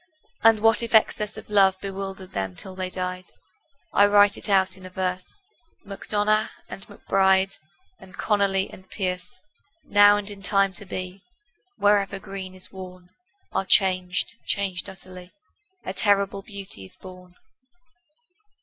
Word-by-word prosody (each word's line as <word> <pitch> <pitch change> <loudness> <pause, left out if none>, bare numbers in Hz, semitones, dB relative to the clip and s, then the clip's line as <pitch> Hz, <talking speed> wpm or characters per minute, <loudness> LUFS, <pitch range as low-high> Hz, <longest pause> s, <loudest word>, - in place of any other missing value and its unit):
And 225 -1 +5
what 225 0 +4
if 235 -1 0
excess 210 -1 +2
of - - -10
love 195 -2 +4
Bewildered 195 -1 -6
them 95 -2 -3
till 190 - -7
they 185 0 -4
died? 185 0 -4 0.7
I 205 - +6
write 205 0 +5
it - - -9
out 190 -1 +3
in 190 - -16
a 185 - -8
verse 185 - -4 0.4
MacDonagh 210 +2 0 0.2
and 195 - -10
MacBride 195 -1 +2 0.4
And 185 -1 -15
Connolly 200 -2 +1
and 185 0 -14
Pearse 180 -3 -4 0.4
Now 205 0 +6
and 205 -1 -5
in 200 -1 -10
time 195 0 +2
to 205 - -6
be, 185 +1 -6 0.6
Wherever 200 -1 +2
green 195 -1 -8
is 185 - -9
worn, 185 -1 -11 0.4
Are - - 0
changed, 185 +2 +1
changed 195 -1 -1
utterly: 185 -1 -13 0.5
A 185 - -3
terrible 200 -1 +1
beauty 195 - -8
is 95 - -15
born. 180 -1 -13
195 Hz, 140 wpm, -24 LUFS, 185-205 Hz, 0.7 s, I